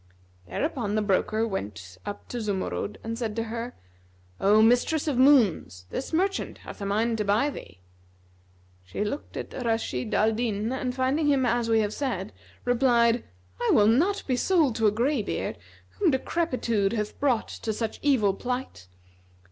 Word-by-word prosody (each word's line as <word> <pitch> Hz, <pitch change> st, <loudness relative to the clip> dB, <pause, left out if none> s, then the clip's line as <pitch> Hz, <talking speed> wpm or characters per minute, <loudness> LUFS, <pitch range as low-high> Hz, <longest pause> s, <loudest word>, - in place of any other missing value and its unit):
Thereupon 245 Hz, -9 st, -2 dB
the 215 Hz, -, +1 dB
broker 215 Hz, +3 st, +1 dB
went 95 Hz, -, -6 dB
up 205 Hz, -, -6 dB
to 245 Hz, -, -4 dB
Zumurrud 200 Hz, 0 st, -3 dB
and 230 Hz, +1 st, -4 dB
said 220 Hz, -3 st, -3 dB
to 225 Hz, -, -1 dB
her, 230 Hz, +2 st, -5 dB, 0.6 s
"O 205 Hz, +2 st, +5 dB
mistress 245 Hz, +7 st, +3 dB
of 290 Hz, -, +1 dB
moons 205 Hz, -, +4 dB
this 265 Hz, -, -4 dB
merchant 375 Hz, +4 st, 0 dB
hath -, -, -9 dB
a 200 Hz, -, -2 dB
mind 225 Hz, +3 st, 0 dB
to -, -, +1 dB
buy 215 Hz, +9 st, +2 dB
thee." 90 Hz, -, -11 dB, 1.0 s
She 90 Hz, -, -4 dB
looked 280 Hz, +8 st, -5 dB
at -, -, -6 dB
Rashid 225 Hz, -, -2 dB
al 215 Hz, +2 st, +4 dB
Din 220 Hz, 0 st, -1 dB
and 255 Hz, -1 st, -2 dB
finding 270 Hz, +4 st, +1 dB
him 275 Hz, -3 st, +3 dB
as 240 Hz, -1 st, +1 dB
we 225 Hz, -1 st, +4 dB
have 210 Hz, 0 st, -1 dB
said, 215 Hz, -8 st, -3 dB, 0.3 s
replied, 240 Hz, -1 st, +3 dB, 0.4 s
"I -, -, 0 dB
will 205 Hz, -, +6 dB
not 340 Hz, -, +3 dB
be 255 Hz, -, +1 dB
sold 305 Hz, -4 st, +2 dB
to 225 Hz, -, +3 dB
a -, -, +4 dB
gray 245 Hz, +4 st, +1 dB
beard, 200 Hz, -, -3 dB, 0.3 s
whom 390 Hz, -4 st, +1 dB
decrepitude 255 Hz, -8 st, 0 dB
hath 210 Hz, -2 st, -3 dB
brought 260 Hz, -5 st, +1 dB
to 220 Hz, -, -4 dB
such 220 Hz, +1 st, -3 dB
evil 245 Hz, -9 st, +3 dB
plight. 245 Hz, -, -5 dB
230 Hz, 165 wpm, -26 LUFS, 210-260 Hz, 1.0 s, will